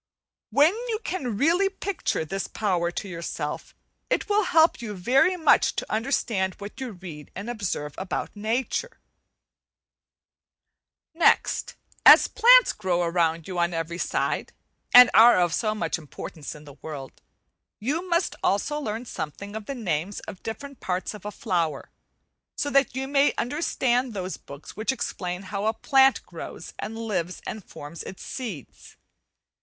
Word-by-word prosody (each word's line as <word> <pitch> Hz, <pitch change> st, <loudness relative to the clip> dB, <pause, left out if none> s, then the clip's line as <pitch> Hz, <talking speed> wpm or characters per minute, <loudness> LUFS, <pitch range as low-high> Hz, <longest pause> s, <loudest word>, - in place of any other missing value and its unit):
When 290 Hz, -, +5 dB
you 450 Hz, -2 st, -1 dB
can 250 Hz, -, -3 dB
really 345 Hz, -, +3 dB
picture 385 Hz, -, -2 dB
this 195 Hz, +5 st, -3 dB
power 180 Hz, -5 st, 0 dB
to 185 Hz, +3 st, -5 dB
yourself 170 Hz, -4 st, -5 dB, 0.3 s
it -, -, 0 dB
will 420 Hz, -1 st, +2 dB
help 320 Hz, -6 st, +4 dB
you 215 Hz, -3 st, -5 dB
very 265 Hz, -, +3 dB
much 320 Hz, -, +4 dB
to -, -, -4 dB
understand 215 Hz, -5 st, 0 dB
what 205 Hz, +6 st, -9 dB
you 250 Hz, -4 st, -4 dB
read 170 Hz, -5 st, -10 dB
and 200 Hz, +4 st, -6 dB
observe 195 Hz, -11 st, -3 dB
about 190 Hz, +2 st, -4 dB
nature. 245 Hz, -, -2 dB, 2.1 s
Next, 330 Hz, +1 st, +2 dB, 0.3 s
as -, -, +9 dB
plants -, -, +6 dB
grow 180 Hz, -4 st, 0 dB
around 170 Hz, -1 st, 0 dB
you 185 Hz, -2 st, -3 dB
on 170 Hz, 0 st, +1 dB
every 165 Hz, +1 st, -3 dB
side, -, -, -1 dB, 0.4 s
and 245 Hz, 0 st, +10 dB
are 230 Hz, -3 st, +8 dB
of 175 Hz, -2 st, +2 dB
so 215 Hz, +3 st, 0 dB
much 170 Hz, -4 st, -2 dB
importance 155 Hz, 0 st, -8 dB
in 150 Hz, 0 st, -13 dB
the 145 Hz, -1 st, -13 dB
world, 145 Hz, -4 st, -8 dB, 0.6 s
you 315 Hz, -, -2 dB
must 340 Hz, +1 st, +1 dB
also 250 Hz, +10 st, +1 dB
learn 225 Hz, -3 st, -4 dB
something 200 Hz, +1 st, -6 dB
of 220 Hz, -1 st, -6 dB
the 275 Hz, -, -4 dB
names 185 Hz, -, -2 dB
of 200 Hz, -, -9 dB
the -, -, -35 dB
different 275 Hz, +4 st, -6 dB
parts 185 Hz, +2 st, -2 dB
of 210 Hz, -2 st, -11 dB
a 210 Hz, -, -3 dB
flower, 175 Hz, -8 st, -2 dB, 0.7 s
so 285 Hz, -, -1 dB
that 275 Hz, -2 st, +3 dB
you 265 Hz, 0 st, -2 dB
may 280 Hz, +1 st, +3 dB
understand 250 Hz, -3 st, 0 dB
those 185 Hz, -1 st, -3 dB
books 140 Hz, +1 st, -12 dB
which 215 Hz, +6 st, 0 dB
explain 180 Hz, -7 st, -4 dB
how 200 Hz, +2 st, -3 dB
a 220 Hz, -, +1 dB
plant 270 Hz, -1 st, +4 dB
grows -, -, -9 dB
and 225 Hz, +1 st, -5 dB
lives 185 Hz, -6 st, -3 dB
and 215 Hz, -2 st, -6 dB
forms 150 Hz, +1 st, -9 dB
its 190 Hz, -, -9 dB
seeds. 215 Hz, -, -8 dB
210 Hz, 155 wpm, -25 LUFS, 175-265 Hz, 2.1 s, and